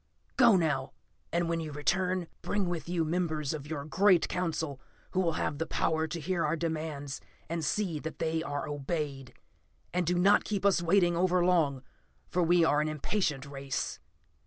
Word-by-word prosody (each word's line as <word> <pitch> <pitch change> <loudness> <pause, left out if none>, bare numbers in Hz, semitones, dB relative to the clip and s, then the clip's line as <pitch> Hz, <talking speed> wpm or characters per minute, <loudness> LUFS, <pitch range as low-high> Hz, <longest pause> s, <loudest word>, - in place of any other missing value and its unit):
"Go, 240 -5 +6
now 150 -6 0 0.4
and 170 0 +1
when 165 0 0
you 155 -2 -5
return, 180 +5 0 0.2
bring 205 -3 -1
with 170 -2 -4
you 170 -2 +1
members 155 -3 -1
of 145 -2 -6
your 145 -2 -4
great 180 +3 +4
Council 160 -6 -2 0.3
who 185 - 0
will 170 -3 +2
have 145 - -2
the 165 - -1
power 160 0 0
to 170 - -4
hear 170 +2 -1
our 150 +2 +1
demands, 155 -4 -3 0.3
and 165 0 -3
see 170 0 0
that 160 +2 -6
they 160 0 0
are 145 -3 -3
obeyed. 145 -2 -4 0.6
And 180 -2 0
do 175 0 +2
not 195 +3 +5
keep 200 -2 -2
us 195 -3 +4
waiting 175 0 +3
over 180 0 +2
long, 150 -7 +2 0.5
for 180 - +1
we 170 0 +4
are 150 -1 +3
an 155 - 0
impatient 150 -2 -1
race." 140 -1 -4
165 Hz, 180 wpm, -30 LUFS, 150-180 Hz, 0.6 s, Go